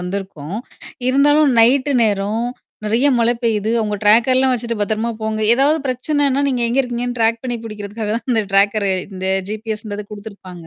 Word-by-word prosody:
வந்திருக்கோம். 180 -2 -5 0.5
இருந்தாலும் 290 +2 +4
நைட் 260 +5 +4
நேரம் 210 +1 0 0.4
நிறைய 230 +6 +2
மழை 235 +1 +2
பெய்யுது. 220 -2 0
அவங்க 210 -1 -2
டிராக் 220 +4 +5
எல்லாம் 260 0 +3
வச்சிட்டு 235 -1 -4
பத்திரமா 220 +2 -1
போங்க. 220 0 -2
ஏதாவது 285 +5 +3
பிரச்சனன்னா, 280 +2 0
நீங்க 250 -3 -1
எங்க 255 +4 +2
இருக்கீங்க? 245 -1 -3
டிராக் 230 0 +1
பண்ணி 245 -2 -3
பிடிக்கறதுக்காகதான் 215 +1 -5
அந்த 225 -3 +2
டிராக்கர் 200 +1 +3 0.2
இந்த 190 0 -5 0.2
G-P-S 215 0 -5
ன்றது 205 0 -5
கொடுத்திருப்பாங்க. 200 -5 -11
225 Hz, 150 wpm, -18 LUFS, 205-245 Hz, 0.5 s, டிராக்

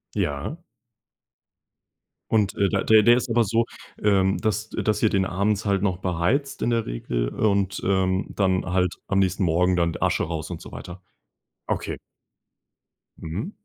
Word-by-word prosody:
Ja. 75 - -2 1.7
Und, 105 -4 +2
äh, 100 -1 +2
da - - 0
der 110 -1 +6
der 120 +2 +6
ist 125 - -2
aber 115 0 +3
so, 115 +3 +1 0.4
ähm, 95 -2 +3
dass 110 0 -1
dass 105 -1 -1
ihr 110 - +4
den 95 -1 +1
abends 100 +3 0
halt 100 -1 +1
noch 95 -4 0
beheizt 95 - -1
in - - +1
der 115 -1 +1
Regel - - -2
und, 100 -2 0
ähm, 95 0 +1
dann 95 -2 0
halt 90 0 +1
am 100 - 0
nächsten 95 0 +1
Morgen 90 +2 +2
dann 85 -2 +1
Asche - - +1
raus 80 +1 -5
und 85 - -6
so - - -11
weiter? 90 +1 -9 0.7
Okay. - - -3 1.2
Mhm. 95 - -5
95 Hz, 160 wpm, -24 LUFS, 90-110 Hz, 1.7 s, der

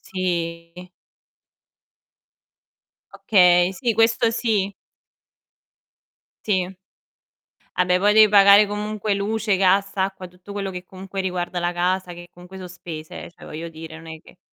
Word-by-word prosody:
sì. 170 -2 -4 2.4
Okay, 180 -3 +4
sì, 235 +2 -1
questo 225 +1 +3
sì. 215 -4 -1 1.7
Sì. 190 -2 -1 1.0
Vabbè 180 0 +2
poi 205 +2 +3
devi 215 -1 +7
pagare 200 0 +7
comunque 210 0 -3
luce, 205 0 -1
gas, 195 +1 +2
acqua, 190 -1 -3
tutto 180 +3 -15
quello 200 -1 -4
che 180 0 -7
comunque 190 +1 -7
riguarda 180 -1 -3
la 175 0 -1
casa 180 +1 -1
che 175 0 -11
comunque 180 +2 -13
so' 185 -1 -8
spese 165 -3 -9
eh, - - -12
cioè - - -16
voglio 165 +2 -7
dire 160 0 -10
non 165 0 -13
è 160 -1 -9
che - - -19
185 Hz, 130 wpm, -22 LUFS, 175-200 Hz, 2.4 s, devi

